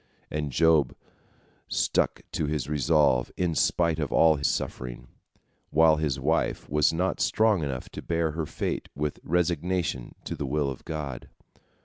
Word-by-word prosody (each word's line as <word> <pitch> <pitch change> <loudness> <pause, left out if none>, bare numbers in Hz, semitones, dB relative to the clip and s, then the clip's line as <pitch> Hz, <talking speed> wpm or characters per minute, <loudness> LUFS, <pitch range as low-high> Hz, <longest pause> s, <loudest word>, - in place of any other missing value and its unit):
" - - -38
And 75 -2 -2
Job 80 -2 +3 0.7
stuck - - 0
to 75 - -1
his 75 -3 -2
resolve 75 -3 +2
in 90 -2 0
spite 85 0 +2
of 75 -4 -2
all 80 -3 +4
suffering, 60 -3 -3 0.6
while 80 0 +5
his 75 -3 -1
wife - - 0
was 75 0 +3
not 90 +3 -1
strong 110 -5 +3
enough 65 -3 -4
to - - -8
bear 85 -1 0
her 80 0 -3
fate - - -3
with 75 0 -3
resignation 85 -5 -1
to - - -4
the 70 - -4
will 70 0 0
of 65 - -10
God. 75 -5 -5
75 Hz, 150 wpm, -27 LUFS, 70-80 Hz, 0.7 s, while